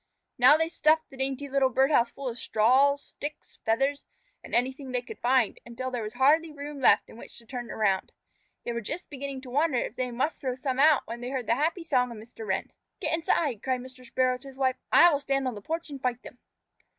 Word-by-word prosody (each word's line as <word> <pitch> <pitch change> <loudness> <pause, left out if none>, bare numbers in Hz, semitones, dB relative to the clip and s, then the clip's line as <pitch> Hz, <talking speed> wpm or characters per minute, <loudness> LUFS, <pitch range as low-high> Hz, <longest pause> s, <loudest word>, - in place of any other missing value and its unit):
Now 260 +5 +8
they 325 0 +1
stuffed 315 -1 +2
the 265 - -12
dainty 270 +1 -2
little 270 -1 +2
bird 265 +3 +2
house 240 -5 +4
full 275 +2 -7
of 235 - -3
straws, 270 +6 +3
sticks, 295 +1 -9
feathers, 270 +6 +1 0.4
and - - -5
anything 260 +2 -1
they 250 -1 -1
could - - -10
find, 250 -2 +2
until 255 +2 -5
there 245 -2 -2
was 215 0 -5
hardly 305 +5 +4
room 290 0 -7
left 260 - +4
in - - -14
which - - -12
to 235 - -15
turn 240 0 -6
around. 200 -4 0 0.5
They 240 - -3
were 235 - -3
just 305 - -6
beginning 275 -1 -5
to 255 -2 -10
wonder 290 0 +2
if 235 - -2
they 250 0 -2
must 265 +6 -2
throw 255 -2 -2
some 260 0 -3
out 300 0 +5
when 235 +1 -7
they 245 - -4
heard 260 -3 -3
the 230 - +2
happy 320 +7 0
song 255 -6 +1
of 235 - -8
Mr. 220 0 -10
Wren. 190 -1 -2 0.3
"Get - - -2
inside!" 305 -7 0
cried 255 -1 -1
Mr. 255 0 -12
Sparrow 255 +1 0
to 275 - -13
his 265 -1 -12
wife. 260 -1 +1
"I 345 0 +8
will 285 - +1
stand 275 -1 -1
on 255 - -2
the 205 - -8
porch 325 +6 -4
and 275 -2 -7
fight 250 -1 -2
them." 245 - -12
260 Hz, 235 wpm, -28 LUFS, 245-285 Hz, 0.5 s, Now